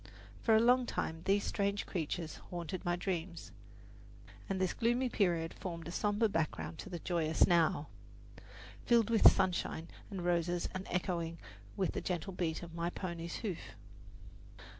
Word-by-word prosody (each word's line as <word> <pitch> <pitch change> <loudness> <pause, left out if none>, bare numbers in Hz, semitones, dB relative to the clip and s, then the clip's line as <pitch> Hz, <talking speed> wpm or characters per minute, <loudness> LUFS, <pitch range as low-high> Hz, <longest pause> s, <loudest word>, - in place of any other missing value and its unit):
For 225 - +4
a - - +7
long 245 +2 +4
time 160 -6 -2
these 200 +1 +3
strange 200 0 0
creatures 165 -2 -3
haunted 175 0 -4
my 175 0 +1
dreams, 175 -1 -4 1.0
and 195 -1 -1
this 185 -1 +1
gloomy 240 +2 +1
period 170 -7 +1
formed 170 -4 -6
a - - -5
somber 210 +4 +2
background 165 -3 -2
to - - -7
the 175 - -4
joyous 160 -2 +2
Now, 165 -3 +3 1.0
filled 235 -1 +4
with 225 - +9
sunshine 175 -2 -1 0.2
and 185 -3 -5
roses 175 0 +1
and 185 0 -5
echoing 170 -2 -1 0.4
with 190 -2 +1
the - - -3
gentle 180 +1 -3
beat 170 -2 -2
of 170 -1 -9
my 170 0 -1
pony's 170 -2 -5
hoof. 185 -6 -5
175 Hz, 150 wpm, -34 LUFS, 170-200 Hz, 1.0 s, with